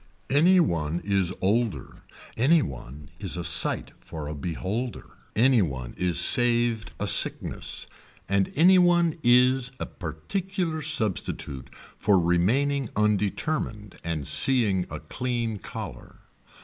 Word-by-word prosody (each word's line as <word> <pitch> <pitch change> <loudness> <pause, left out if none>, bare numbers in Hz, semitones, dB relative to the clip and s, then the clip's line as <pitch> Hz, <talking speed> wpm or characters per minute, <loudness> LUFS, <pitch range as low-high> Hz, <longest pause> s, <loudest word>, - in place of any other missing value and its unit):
Any 175 +7 +5
one 85 - 0
is 95 -3 0
older. 100 - -1 0.3
Any 150 +8 +3
one 70 +1 -9
is 95 -3 -1
a 85 - -4
sight - - +3
for 80 -3 -8
a 75 - -5
beholder. 95 - -5 0.2
Any 125 +1 +4
one 65 -8 -4
is 90 -2 0
saved 120 -2 +3
a - - -2
sickness. - - -1 0.4
And 100 0 0
any 180 +5 +6
one 175 -2 +2
is 125 +1 +3
a - - -3
particular 165 - -4
substitute 110 - -2
for 105 -2 -1
remaining 110 +11 +1
undetermined 105 +1 -2
and 80 -4 -4
seeing 105 -9 +4
a - - -6
clean 120 -4 -3
collar. - - -9
110 Hz, 120 wpm, -25 LUFS, 85-135 Hz, 0.4 s, any